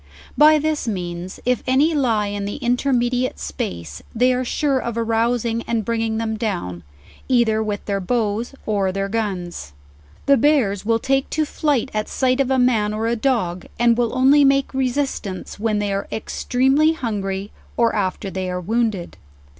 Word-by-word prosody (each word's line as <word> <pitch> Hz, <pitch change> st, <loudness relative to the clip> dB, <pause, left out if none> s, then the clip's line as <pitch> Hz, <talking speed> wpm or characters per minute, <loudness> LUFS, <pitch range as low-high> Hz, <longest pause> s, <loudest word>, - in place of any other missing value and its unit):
By 305 Hz, +1 st, +7 dB
this 305 Hz, -2 st, -1 dB
means, 180 Hz, -3 st, -4 dB
if 250 Hz, 0 st, +1 dB
any 280 Hz, +6 st, +3 dB
lie 235 Hz, -8 st, +1 dB
in 205 Hz, 0 st, -3 dB
the 205 Hz, -, -4 dB
in 245 Hz, -3 st, +1 dB
termediate 250 Hz, -1 st, 0 dB
space, 75 Hz, +1 st, -5 dB
they 250 Hz, +2 st, +3 dB
are 250 Hz, +1 st, -1 dB
sure 275 Hz, +1 st, 0 dB
of 235 Hz, -2 st, -4 dB
arousing 230 Hz, 0 st, 0 dB
and 225 Hz, -3 st, -1 dB
bringing 225 Hz, -1 st, -1 dB
them 220 Hz, -1 st, -2 dB
down, 175 Hz, -, -3 dB, 0.5 s
either 235 Hz, -4 st, +3 dB
with 210 Hz, -2 st, -3 dB
their 200 Hz, -1 st, -1 dB
bows 225 Hz, +4 st, -1 dB
or 200 Hz, -3 st, 0 dB
ther 195 Hz, +1 st, -2 dB
guns. 185 Hz, -, -4 dB, 0.5 s
The 280 Hz, 0 st, +5 dB
bears 225 Hz, -8 st, +2 dB
will 225 Hz, +1 st, +2 dB
take 270 Hz, +3 st, 0 dB
to 310 Hz, 0 st, 0 dB
flight 285 Hz, -4 st, 0 dB
at 215 Hz, 0 st, -2 dB
sight 255 Hz, 0 st, +1 dB
of 270 Hz, -2 st, +2 dB
a 265 Hz, -, +2 dB
man 220 Hz, -4 st, +2 dB
or 220 Hz, +1 st, -2 dB
a 230 Hz, +1 st, +1 dB
dog, 220 Hz, -8 st, -1 dB
and 235 Hz, 0 st, +4 dB
will 240 Hz, +1 st, 0 dB
only 275 Hz, +3 st, +6 dB
make 275 Hz, 0 st, +3 dB
resistance 260 Hz, -8 st, -2 dB
when 215 Hz, -1 st, 0 dB
they 205 Hz, -1 st, -1 dB
are 195 Hz, -, -3 dB
extremely 265 Hz, +7 st, +1 dB
hungry, 205 Hz, -7 st, -3 dB, 0.3 s
or 235 Hz, -1 st, +3 dB
after 195 Hz, -1 st, -2 dB
they 185 Hz, -1 st, -3 dB
are 180 Hz, 0 st, -2 dB
wounded. 215 Hz, -1 st, -1 dB
230 Hz, 170 wpm, -21 LUFS, 200-255 Hz, 0.5 s, By